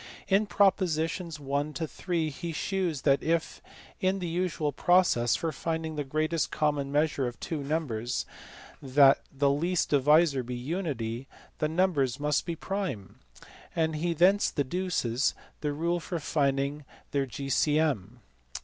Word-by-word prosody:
In 205 +2 +3
propo 195 -2 +3
sitions 165 +1 -2
1 145 +2 -2
to 160 -1 -3
3 165 -2 -2
he 170 +4 -5
shews 175 -3 -2
that 140 -1 +3
if, 165 0 -1 0.4
in 190 +1 +1
the 185 - -4
usual 165 -3 -1
process 155 -6 +3
for 165 - -2
finding 160 +1 -3
the 145 - -2
greatest 155 +4 0
common, 145 -2 0
measure 145 -3 +1
of 120 - -7
two 160 -3 -4
numbers, 125 -6 -2 0.6
the 135 0 +6 0.3
last 145 +6 +2
divisor 150 0 +4
be 125 0 -5
unity, 130 -4 -3 0.3
the 155 - +1
numbers 155 -7 +1
must 150 +2 0
be 170 - -2
prime; 170 - -4 0.6
and 160 -1 +1
he 170 +2 -1
thence 190 +5 +4
deduces 145 -4 0 0.2
the 150 - -1
rule 170 +4 0
for 170 +1 -4
finding 140 -1 0 0.3
their 140 -1 0
G.C.M. 135 -4 0
155 Hz, 140 wpm, -28 LUFS, 140-170 Hz, 0.6 s, the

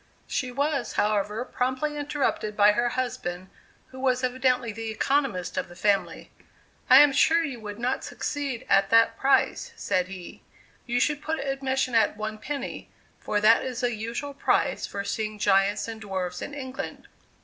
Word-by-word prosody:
She 255 -2 -2
was, 280 0 -1
however, 210 +2 0
promptly 260 +5 -2
interrupted 285 -7 -2
by 205 0 +7
her 240 +3 +1
husband, 185 -8 -3 0.4
who 260 - -11
was 255 -1 +1
evidently 255 -2 +1
the 225 +1 -5
economist 235 -6 0
of - - -2
the 175 - -12
family: 200 +2 0 0.6
"I 260 +2 +10
am 295 -1 +6
sure 330 +4 +4
you 270 -7 -4
would 205 -1 -7
not 250 +3 -1
succeed 280 -5 -4
at 195 0 +4
that 230 +1 +5
price," 275 - +1
said 185 - 0
he; 185 -2 -10 0.5
"you 240 0 +1
should 295 +3 +1
put 320 +1 -2
admission 270 -2 -1
at 225 -2 +3
one 215 0 -4
penny, 280 +5 -5 0.3
for 210 - -1
that 225 +2 +5
is 255 -1 -4
the 245 -1 0
usual 230 +6 -4
price 280 - +1
for 200 - -4
seeing 215 +1 -3
giants 200 +1 +2
and 225 -1 -7
dwarfs 185 -3 -4
in 290 - -6
England." 260 -2 -6
240 Hz, 165 wpm, -26 LUFS, 210-270 Hz, 0.6 s, I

